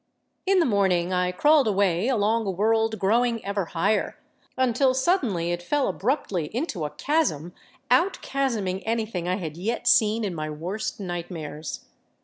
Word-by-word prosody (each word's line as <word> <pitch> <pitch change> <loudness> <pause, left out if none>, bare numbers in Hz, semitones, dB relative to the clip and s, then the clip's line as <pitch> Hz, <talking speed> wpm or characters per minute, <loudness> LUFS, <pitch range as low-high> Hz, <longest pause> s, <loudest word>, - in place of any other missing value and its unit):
In 390 0 +4
the 345 - +4
morning 185 -5 +1
I 180 0 +1
crawled 295 +7 +4
away 195 -1 +1
along 225 -3 +1
a - - +1
world 220 +3 +1
growing 230 +3 +1
ever 200 -1 -1
higher, 195 +6 0 0.4
until 255 +1 +2
suddenly 255 - +1
it 175 0 -2
fell 285 +10 0
abruptly 195 - -1
into 235 - -2
a - - -3
chasm 175 - -1 0.4
out 370 +3 +3
chasming 220 -9 -1
anything 220 -6 -2
I 180 - +1
had 165 -5 -6
yet 220 +7 -3
seen 220 +1 +4
in 195 -4 -2
my 155 -2 -4
worst 175 +10 -4
nightmares. 165 -5 -6
205 Hz, 150 wpm, -25 LUFS, 175-240 Hz, 0.4 s, In